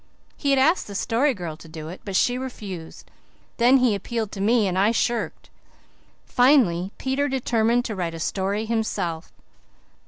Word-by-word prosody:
He 285 - -2
had 275 - +4
asked 315 +7 +3
the 200 - -8
Story 250 +7 +1
Girl 170 -4 -5
to 160 - -14
do 155 -1 -8
it, 180 - -9
but 195 -2 -5
she 245 +6 +3
refused; 205 -10 -7 0.5
then 250 +3 +5
he 250 -4 +3
appealed 220 +1 -3
to 195 - -6
me 220 0 +3
and 180 - -1
I 195 +3 +3
shirked. 235 +1 -2 0.7
Finally 235 - +3
Peter 270 +2 -1
determined 240 -2 +1
to 220 - -3
write 170 -3 -3
a - - -7
story 200 +5 -1
himself. 200 -7 -2
220 Hz, 165 wpm, -24 LUFS, 185-250 Hz, 0.7 s, then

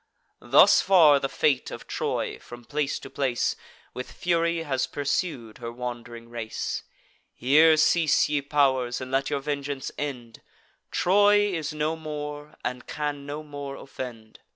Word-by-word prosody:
Thus - - +6
far 160 -7 +6
the 135 - -2
fate 135 -1 +1
of - - -8
Troy, - - -2
from 120 0 -12
place 145 +1 -1
to - - -9
place, 130 -4 -1 0.4
With 125 - -6
fury 170 -1 0
has 135 -5 -1
pursued 140 -5 -3
her 115 -1 -5
wand'ring 120 -1 -7
race. 115 -2 -4 0.5
Here 155 +5 +5
cease, 160 0 +4
ye 145 -1 0
pow'rs, 135 -4 +1
and 130 -1 -7
let 135 0 +1
your 140 - -1
vengeance 140 -1 -3
end: 125 -6 -5 0.5
Troy 205 +2 +4
is 160 -2 -2
no 155 +1 -1
more, 150 -1 -7
and 125 +1 -4
can 145 -1 -4
no 150 +2 -5
more 145 -2 -7
offend. 120 -6 -9
145 Hz, 145 wpm, -26 LUFS, 125-155 Hz, 0.5 s, Thus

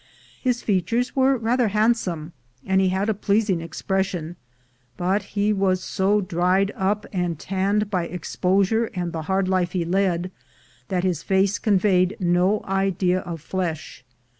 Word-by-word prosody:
His 250 -2 0
features 210 +5 0
were 265 0 +3
rather 235 +1 +1
handsome, 200 -7 0 0.3
and 190 0 +2
he 190 - +3
had 190 +2 0
a 220 - +2
pleasing 200 -3 +1
expression; 175 0 -2 0.6
but 190 +4 +1 0.2
he 205 +1 +3
was 190 -2 +1
so 205 +2 +1
dried 185 +2 +1
up 205 +2 0
and 175 -3 -1
tanned 200 +4 -1
by 180 -3 0
exposure 190 +5 0
and 175 -2 -3
the 160 - -3
hard 190 0 +1
life 185 -2 0
he 175 -3 -1
led, 180 0 0 0.6
that 180 -1 -1
his 180 -5 0
face 195 +1 +1
conveyed 190 -2 +2
no 180 +3 +2
idea 195 -1 +1
of 170 -4 -7
flesh. 165 -6 -4
190 Hz, 145 wpm, -23 LUFS, 180-205 Hz, 0.6 s, were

